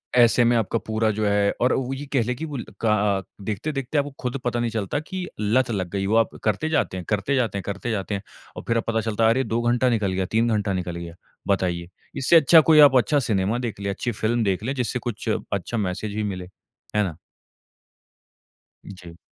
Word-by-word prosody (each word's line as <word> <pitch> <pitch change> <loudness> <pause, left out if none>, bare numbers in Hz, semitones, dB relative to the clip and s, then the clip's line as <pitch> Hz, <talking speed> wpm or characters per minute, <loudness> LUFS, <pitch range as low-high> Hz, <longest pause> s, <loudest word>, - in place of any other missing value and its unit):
ऐसे 120 0 +5
में 120 +1 +3
आपका 115 0 0
पूरा 110 0 +1
जो 110 +1 -1
है 100 0 +2
और 125 - +3
वो 130 0 -1
ये 135 +2 -6
कह 130 - +3
ले 125 +2 -2
की 160 - -5 0.4
का 110 -2 +3 0.2
अ, - - -3 0.2
देखते 105 +9 -3
देखते 135 +1 -3
आपको 145 0 0
खुद 125 +1 -3
पता 120 0 0
नहीं 120 0 0
चलता 110 +5 -2
की 185 +4 -5
लत 115 +5 +2
लग 95 -5 -2
गयी, 100 -1 -1
वो 110 - +1
आप 115 0 +2
करते 110 +9 0
जाते 145 -11 0
हैं, 90 - -6
करते 105 +6 0
जाते 120 -6 0
हैं, 100 - -4
करते 100 +4 -3
जाते 105 -1 -2
हैं 100 - -4 0.4
और - - -6
फ़िर 115 - +2
अब 115 - 0
पता 115 -1 +1
चलता 110 0 -1
है 110 - +6
अरे! 130 +4 +2
2 115 0 -1
घंटा 120 +2 +2
निकल 105 -5 0
गया, 95 0 -1
3 110 +5 +1
घंटा 105 -1 -1
निकल 90 -2 -3
गया। 85 -1 -7 0.3
बताइए, 90 -3 0 0.3
इससे 135 +4 +3
अच्छा 160 +1 +7
कोई 155 - +7
आप 145 -3 +8
अच्छा 145 +4 +3
सिनेमा 105 -3 0
देख 110 - -7
लें, 100 0 -3
अच्छी 100 +5 -2
फ़िल्म 115 +2 0
देख 95 -1 0
लें, 130 +4 -1
जिससे 125 -1 -1
कुछ 115 -1 -4 0.2
अच्छा 100 +4 -2
मैसेज 100 +1 -3
भी 110 - -1
मिले। 95 -3 -4 0.5
है 105 - +3
ना? 85 -6 -4 1.7
जी। 90 -3 -11
110 Hz, 225 wpm, -24 LUFS, 100-125 Hz, 1.7 s, आप